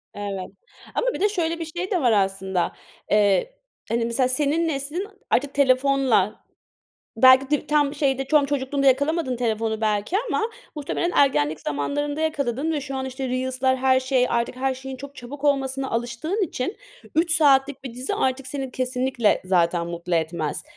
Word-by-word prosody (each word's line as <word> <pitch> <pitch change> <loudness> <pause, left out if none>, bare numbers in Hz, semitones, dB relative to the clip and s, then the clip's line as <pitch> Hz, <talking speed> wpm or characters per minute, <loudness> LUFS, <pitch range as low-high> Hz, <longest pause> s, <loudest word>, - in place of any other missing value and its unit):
Evet, 200 -2 -5 0.5
ama - - 0
bir - - -5
de 415 - +3
şöyle 335 -4 -1
bir 330 - -3
şey 350 +5 -5
de 360 -4 +1
var 245 -3 +3
aslında; 190 -3 0 0.4
eee, 210 - +3 0.3
hani, 230 +1 0
mesela 250 +2 +1
senin 295 +5 +1
neslin 305 +6 -3 0.2
artık 275 +2 +1
telefonla, 265 -6 +2 0.7
belki 260 +2 +6
de 295 0 0
tam 295 -1 +2
şeyde 270 -2 0
çom 295 0 +3
çocukluğunda 275 0 -1
yakalamadın 285 +1 +2
telefonu 225 -2 -1
belki 215 - 0
ama - - 0 0.3
muhtemelen 305 +4 -2
ergenlik 155 - +2
zamanlarında 290 - -2
yakaladın. 300 0 -1
Şu 275 -1 -5
an 265 - -3
işte 265 0 -4
Reels'lar, 260 +1 0
her 260 0 +3
şey... 260 -1 +2
Artık 235 +1 -1
her 265 0 0
şeyin 265 0 -7
çok 280 +2 -10
çabuk 275 +4 -9
olmasına 270 -1 0
alıştığın 240 - -2
için 260 - -3 0.4
3 330 +2 +2
saatlik 280 -4 +3
bir 250 -3 -7
dizi 255 +2 -3 0.3
seni 265 0 -5
kesinlikle 255 -2 0
zaten 175 -2 +2
mutlu 170 +1 -3
etmez. 160 -1 -1
265 Hz, 155 wpm, -23 LUFS, 235-290 Hz, 0.7 s, belki